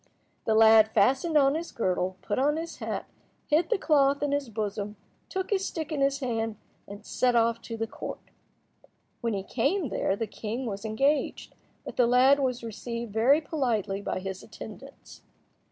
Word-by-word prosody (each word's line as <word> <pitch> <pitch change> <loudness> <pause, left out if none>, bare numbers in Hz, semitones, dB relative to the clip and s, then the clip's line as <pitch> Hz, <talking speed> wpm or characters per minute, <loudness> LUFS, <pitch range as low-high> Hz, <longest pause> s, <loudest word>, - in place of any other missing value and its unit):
The 220 - +2
lad 220 0 +7
fastened 270 +10 +3
on 275 -1 +5
his 330 +2 -4
girdle, 185 -3 -1
put - - -1
on 295 +3 +2
his 330 +1 -5
hat, - - -4 0.4
hid 320 +3 +2
the - - +2
cloth 285 -5 +3
in 290 - 0
his 285 -3 -1
bosom, 210 -1 -3 0.3
took 380 +1 -3
his 390 -2 +1
stick 320 -4 -4
in 295 -3 -1
his 275 +1 +1
hand, 225 -3 -2 0.3
and 205 +2 -10
set 250 -1 +1
off 230 0 +2
to 230 -1 -6
the 225 - -1
Court. 225 - -7 1.0
When 230 -3 -1
he 195 - -3
came 285 - 0
there 195 - 0
the 225 - -2
king 225 +4 -5
was 200 -2 -5
engaged, 270 +7 0 0.3
but - - -8
the 245 - +5
lad 260 +3 +5
was 250 -3 -1
received 230 0 -5
very 260 +8 +4
politely 235 - -1
by - - -3
his 190 0 -5
attendants. - - -11
240 Hz, 175 wpm, -28 LUFS, 220-285 Hz, 1.0 s, lad